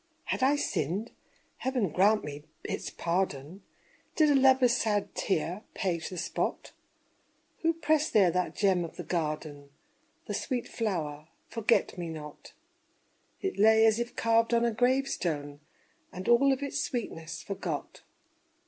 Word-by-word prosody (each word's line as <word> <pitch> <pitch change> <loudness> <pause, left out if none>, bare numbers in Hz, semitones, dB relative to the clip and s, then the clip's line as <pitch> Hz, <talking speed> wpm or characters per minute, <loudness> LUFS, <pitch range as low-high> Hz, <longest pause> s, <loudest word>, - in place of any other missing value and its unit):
Had - - -2
I 270 +3 +4
sinned? 195 - -2 0.5
Heaven 255 -7 0
grant 205 +6 +3
me 145 0 -7 0.2
its - - -4
pardon. 170 -1 -2 0.5
Did 305 -2 +4
a - - +4
lover's 260 -2 +5
sad 210 -4 0
tear 180 +1 -1
the - - -11
page 170 -4 -1
spot? 180 -3 -3 0.9
Who 330 0 +2
pressed 310 -1 +1
there 195 -5 +5
that 180 +1 -1
gem 190 -4 +2
of 165 - -7
the - - -6
garden 150 -4 -3 0.6
The - - -4
sweet 250 -3 -2
flower, 155 -9 -3 0.2
"forget 230 -4 +1
me 170 -1 -4
not?" 150 -2 -9 0.9
It 385 - -2
lay 220 +1 +6
as 220 0 +4
if 240 0 -4
carved 230 +1 +3
on 235 0 +3
a 235 - +2
grave 255 +4 +2
stone, 145 - -3 0.5
And 185 +1 -7
all 250 +4 +5
of 270 +1 -1
its 280 0 -2
sweetness 170 - -5
forgot. 200 - -5
205 Hz, 145 wpm, -29 LUFS, 170-245 Hz, 0.9 s, lay